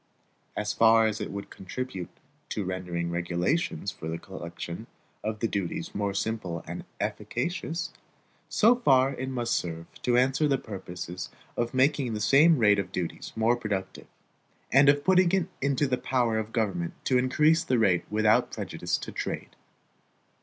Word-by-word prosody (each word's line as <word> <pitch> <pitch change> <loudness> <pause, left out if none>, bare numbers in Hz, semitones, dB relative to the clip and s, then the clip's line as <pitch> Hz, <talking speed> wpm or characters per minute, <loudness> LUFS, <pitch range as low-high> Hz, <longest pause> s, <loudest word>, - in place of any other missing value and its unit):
As 105 0 -1
far 115 0 +6
as 110 0 -1
it - - -3
would 100 0 -7
contribute 95 -1 -5 0.4
to 105 - -2
rendering 90 -2 -3
regulations 85 - -1
for 80 - -8
the 80 +1 -2
collection 85 -2 -7 0.4
of 110 0 -3
the 115 - +2
duties 100 -5 -3
more 100 -1 -1
simple 95 -6 -2
and - - -6
efficacious, 165 +4 -3 0.6
so 230 +3 +5
far 135 - +4
it 130 +1 -4
must 120 -2 -1
serve 85 -1 -2 0.2
to 120 -1 +2
answer 135 +4 +3
the 140 -2 +2
purposes 90 -5 -7 0.3
of 120 +2 -2
making 130 -3 +2
the - - -3
same 145 +9 +6
rate 105 -4 +5
of 95 -2 -3
duties 90 -3 -4
more 115 +2 +3
productive, 105 -5 -4 0.6
and 135 +2 +7
of 145 0 +4
putting 185 0 +4
it 190 -3 +3 0.2
into 140 +1 +2
the 125 -2 0
power 120 -4 +1
of 110 - -3
the 110 - -21
government 95 -7 -1
to 130 -1 +3
increase 155 +6 +3
the 130 -6 +1
rate 95 -6 +3
without 110 0 +3
prejudice - - -2
to - - -7
trade. - - -5
110 Hz, 160 wpm, -28 LUFS, 95-135 Hz, 0.6 s, and